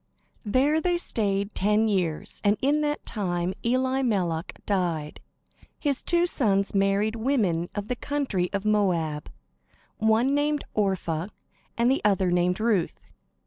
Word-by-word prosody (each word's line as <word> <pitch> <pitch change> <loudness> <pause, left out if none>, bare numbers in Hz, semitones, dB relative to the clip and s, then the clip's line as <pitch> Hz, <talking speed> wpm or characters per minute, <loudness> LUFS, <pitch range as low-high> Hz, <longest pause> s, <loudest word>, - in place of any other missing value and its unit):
There 285 +8 +3
they 350 +1 +1
stayed 200 - -1
ten 210 +3 +2
years, 180 -7 -2
and 205 +1 +3
in 290 +3 +2
that 295 0 -2
time 180 -3 -2
Elimelech 235 -9 0
died. 170 -6 -1 0.6
His 285 -3 -1
two 345 0 +2
sons 200 - +1
married 200 +2 +2
women 220 -9 0
of 205 0 -3
the 250 - -1
country 245 -11 -2
of 200 0 -3
Moab, 175 -8 0 0.7
one 220 +5 +2
named 290 0 +1
Orpah, 185 -5 -1 0.5
the 245 +4 +2
other 190 -3 +2
named 180 +2 +1
Ruth. 215 -6 -1
210 Hz, 125 wpm, -26 LUFS, 180-255 Hz, 0.7 s, There